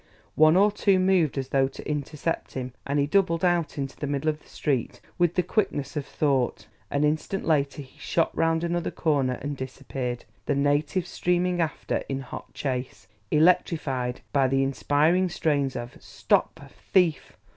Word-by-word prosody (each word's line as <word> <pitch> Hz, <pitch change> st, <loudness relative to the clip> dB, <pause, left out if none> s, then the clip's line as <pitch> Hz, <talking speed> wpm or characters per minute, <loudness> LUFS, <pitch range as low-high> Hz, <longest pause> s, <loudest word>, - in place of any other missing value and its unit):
One 155 Hz, +2 st, +5 dB
or 205 Hz, +2 st, +5 dB
two 200 Hz, -1 st, +2 dB
moved 185 Hz, -6 st, +2 dB
as 135 Hz, -1 st, -3 dB
though 135 Hz, -1 st, +3 dB
to 135 Hz, -, -10 dB
intercept 150 Hz, +2 st, -3 dB
him, 130 Hz, -2 st, -4 dB
and 140 Hz, +1 st, 0 dB
he 140 Hz, -, +3 dB
doubled 170 Hz, +1 st, +2 dB
out 175 Hz, -4 st, +1 dB
into 135 Hz, -1 st, -4 dB
the 145 Hz, -, -4 dB
middle 145 Hz, +2 st, 0 dB
of 150 Hz, 0 st, -11 dB
the -, -, -22 dB
street 135 Hz, -6 st, -2 dB, 0.2 s
with 175 Hz, -1 st, +2 dB
the 180 Hz, -, +2 dB
quickness 170 Hz, -10 st, -1 dB
of 145 Hz, -2 st, -3 dB
thought; 130 Hz, -8 st, 0 dB, 0.2 s
an 145 Hz, +1 st, 0 dB
instant 155 Hz, +6 st, -1 dB
later 145 Hz, -2 st, +1 dB
he 130 Hz, -, -20 dB
shot 165 Hz, -, 0 dB
round 165 Hz, 0 st, +1 dB
another 175 Hz, 0 st, -1 dB
corner 140 Hz, -6 st, +1 dB
and 145 Hz, 0 st, -3 dB
disappeared, 130 Hz, -2 st, -5 dB, 0.2 s
the -, -, +2 dB
natives 145 Hz, +5 st, +1 dB
streaming 180 Hz, 0 st, +1 dB
after 160 Hz, -2 st, -1 dB
in 135 Hz, 0 st, -2 dB
hot 135 Hz, -, -9 dB
chase, 130 Hz, -2 st, -4 dB, 0.2 s
electrified 150 Hz, -6 st, +2 dB
by 135 Hz, -2 st, +4 dB
the 135 Hz, +1 st, +2 dB
inspiring 150 Hz, +7 st, +2 dB
strains 145 Hz, -5 st, 0 dB
of 120 Hz, 0 st, -6 dB
"Stop, -, -, 0 dB, 0.3 s
thief!" 175 Hz, -5 st, +2 dB
150 Hz, 165 wpm, -26 LUFS, 135-170 Hz, 0.3 s, One